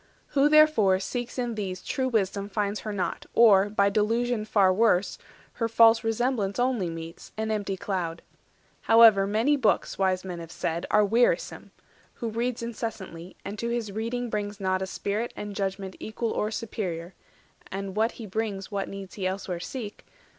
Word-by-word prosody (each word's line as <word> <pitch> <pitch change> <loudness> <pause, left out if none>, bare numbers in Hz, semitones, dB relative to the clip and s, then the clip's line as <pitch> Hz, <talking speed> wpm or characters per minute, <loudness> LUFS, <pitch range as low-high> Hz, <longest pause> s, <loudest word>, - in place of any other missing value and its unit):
Who, 285 0 +3
therefore, 305 -12 +5
seeks 245 +5 -4
in 245 -2 -1
these 190 -4 -4
True 260 -1 -1
wisdom 200 -4 -1
finds 205 0 -1
her 215 - -5
not, 185 -4 -3
or, 205 -4 +6
by 200 -1 +2
delusion 225 +2 +1
Far 195 -3 +4
worse, 200 -2 +2 0.3
her 230 - -1
false 225 0 +6
resemblance 225 -3 0
only 245 -7 +1
meets, 165 0 -8
320 220 - -2
An - - +2
empty 200 -2 -3
cloud. 175 -4 -3 0.6
However, 225 -4 +7
many 225 +8 +2
books, 220 -6 +1
Wise 185 -1 +1
men 180 -2 -5
have 165 -1 -9
said, 165 +1 -3
are 210 0 +4
wearisome; 230 +4 +1 0.5
who 230 - -4
reads 235 +2 -2
Incessantly, 220 -7 -6
and 205 - -6
to 235 - -2
his 235 -3 -2
reading 230 +3 -3
brings 205 -1 -3
not 185 -1 0
A 190 - -2
spirit 210 +4 -3
and 205 -1 -6
judgment 195 -1 -3
equal 220 +1 -3
or 210 - -1
superior, 190 -6 -4 0.6
(And 195 0 -5
what 220 +2 +1
he 230 - -8
brings 205 -1 -3
what 200 -1 -2
needs 195 -1 -8
he 190 -3 -2
elsewhere 185 -2 -3
seek?) 210 +2 -7
210 Hz, 170 wpm, -27 LUFS, 190-230 Hz, 0.6 s, However